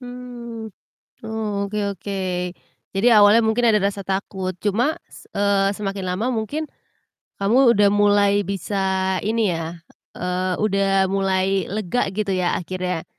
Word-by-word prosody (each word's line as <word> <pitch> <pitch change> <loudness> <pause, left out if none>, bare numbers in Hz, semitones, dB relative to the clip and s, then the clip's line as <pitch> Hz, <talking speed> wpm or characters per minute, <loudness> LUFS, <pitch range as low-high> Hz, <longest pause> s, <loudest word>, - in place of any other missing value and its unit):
Mmm. 245 -2 -8 0.5
Oke 210 -2 -3 0.2
oke. 195 +2 -6 0.7
Jadi, 195 +5 +1
awalnya 210 +2 +6
mungkin 230 +2 +2
ada 215 - +4
rasa 200 0 -1
takut, 190 -1 -3
cuma 240 - 0
s - - -16
eee, 200 -1 +2
semakin 195 -2 -4
lama 185 +6 -1
mungkin 265 +8 -2 0.8
kamu 235 +4 +5
udah 205 0 +4
mulai 205 -1 +3
bisa 200 +1 -3 0.5
ini 220 -1 +1
ya, 165 +1 -6 0.3
eee, 180 +1 -2
udah 195 -2 +2
mulai 195 0 +1
lega 215 +3 0
gitu 210 -1 -2
ya 180 -1 +1
akhirnya. 180 -1 -4
200 Hz, 125 wpm, -22 LUFS, 190-220 Hz, 0.8 s, awalnya